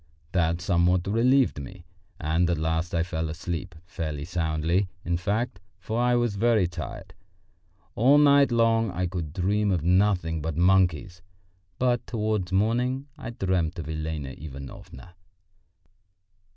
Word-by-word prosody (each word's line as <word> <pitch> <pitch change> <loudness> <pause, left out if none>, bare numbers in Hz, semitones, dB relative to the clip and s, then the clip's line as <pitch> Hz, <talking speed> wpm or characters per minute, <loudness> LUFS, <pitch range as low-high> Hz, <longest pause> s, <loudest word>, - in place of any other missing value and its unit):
That 85 -1 +1
somewhat 90 0 +2
relieved 120 - +2
me, 90 +5 -10 0.3
and 85 +2 +1
at 85 - +1
last 80 +2 -1
I 85 - +2
fell 80 -2 -3
asleep 85 +1 -5
fairly 80 -6 -5
soundly, 85 +2 0 0.2
in 85 - 0
fact, 105 +4 -2 0.2
for 115 +2 -3
I 125 0 +3
was 120 -4 0
very 110 -2 +3
tired. 85 -2 -7 0.8
All 130 +6 +5
night 140 -2 +5
long 115 -1 +3
I 90 0 -2
could 85 -4 -4
dream 100 +5 0
of 90 -5 0
nothing 90 -3 +2
but 80 0 -3
monkeys, 90 +1 +2 0.6
but 125 -1 0
towards 105 -5 -1
morning 125 +7 0
I 145 - -7
dreamt 95 -7 -1
of 80 -3 -5
Elena 80 -2 -4
Ivanovna. 70 +3 -10
90 Hz, 135 wpm, -26 LUFS, 80-110 Hz, 0.8 s, All